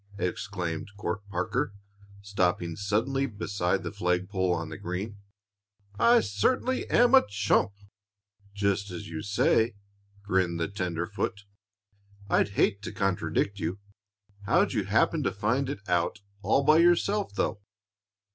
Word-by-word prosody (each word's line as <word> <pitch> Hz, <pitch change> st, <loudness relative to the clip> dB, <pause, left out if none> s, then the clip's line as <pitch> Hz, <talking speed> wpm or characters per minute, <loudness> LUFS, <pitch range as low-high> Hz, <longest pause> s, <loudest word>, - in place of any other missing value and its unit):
exclaimed 90 Hz, -3 st, -3 dB
Court 95 Hz, 0 st, -3 dB
Parker, 100 Hz, +1 st, -2 dB, 0.5 s
stopping 90 Hz, -4 st, 0 dB
suddenly 115 Hz, +8 st, 0 dB
beside 100 Hz, -4 st, -1 dB
the -, -, -4 dB
flagpole 95 Hz, -1 st, 0 dB
on 80 Hz, -2 st, -2 dB
the 80 Hz, -, -7 dB
green. 100 Hz, +3 st, -4 dB, 0.8 s
"I 235 Hz, 0 st, +6 dB
certainly 250 Hz, -, 0 dB
am 245 Hz, +1 st, +4 dB
a 265 Hz, -, +8 dB
chump." 100 Hz, 0 st, +1 dB, 0.8 s
"Just 100 Hz, 0 st, 0 dB
as 90 Hz, -, -7 dB
you 80 Hz, -1 st, -5 dB
say," 110 Hz, +2 st, +2 dB, 0.5 s
grinned 95 Hz, -4 st, 0 dB
the 85 Hz, -, 0 dB
tenderfoot. 95 Hz, +2 st, -3 dB, 0.9 s
"I'd -, -, +3 dB
hate 100 Hz, -, +2 dB
to 105 Hz, -, -6 dB
contradict 100 Hz, +1 st, -1 dB
you. 85 Hz, +2 st, -2 dB, 0.7 s
How'd -, -, +3 dB
you -, -, 0 dB
happen -, -, +2 dB
to -, -, 0 dB
find 125 Hz, +7 st, 0 dB
it 100 Hz, -7 st, -6 dB
out 90 Hz, +4 st, 0 dB, 0.2 s
all 110 Hz, +8 st, +2 dB
by 155 Hz, +2 st, +6 dB
yourself, 185 Hz, +4 st, +2 dB
though?" 105 Hz, -, -1 dB
100 Hz, 130 wpm, -28 LUFS, 90-110 Hz, 0.9 s, a